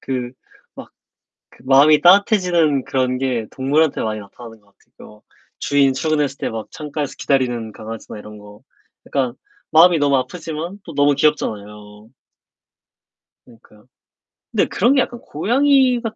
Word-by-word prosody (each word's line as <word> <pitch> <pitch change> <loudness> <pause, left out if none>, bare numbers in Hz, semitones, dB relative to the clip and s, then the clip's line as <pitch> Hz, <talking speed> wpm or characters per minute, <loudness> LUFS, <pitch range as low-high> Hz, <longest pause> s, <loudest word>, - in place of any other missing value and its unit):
그 125 -2 -4 0.4
막 - - -11 0.6
그 - - -21
마음이 140 +3 +5
따뜻해지는 175 - +3
그런 130 -1 -1
게 125 -4 -2
동물한테 145 +4 0
많이 110 -1 -3
나타나는 110 +2 -13
것 100 -1 -31
같으고요. 105 0 -18 0.4
주인 140 -2 +2
출근했을 145 -1 -1
때 - - -3
막 110 -1 -6
창가에서 150 -2 -5
기다리는 120 -5 -1
강아지나 110 0 -9
이런 105 0 -11
거 105 +1 -15 0.5
약간 130 -4 -1 0.4
마음이 170 +2 +6
너무 140 -2 +2
아프지만 165 +7 -5
또 165 - -9
너무 145 0 +2
귀엽잖아요. 105 -7 -3 1.4
그니까요. 110 -2 -21 0.7
근데 - - +2
그런 245 +8 +2
게 265 - +4
약간 240 - -4
고양이 255 - +2
같 225 -2 -5
135 Hz, 320 characters per minute, -19 LUFS, 115-160 Hz, 1.4 s, 마음이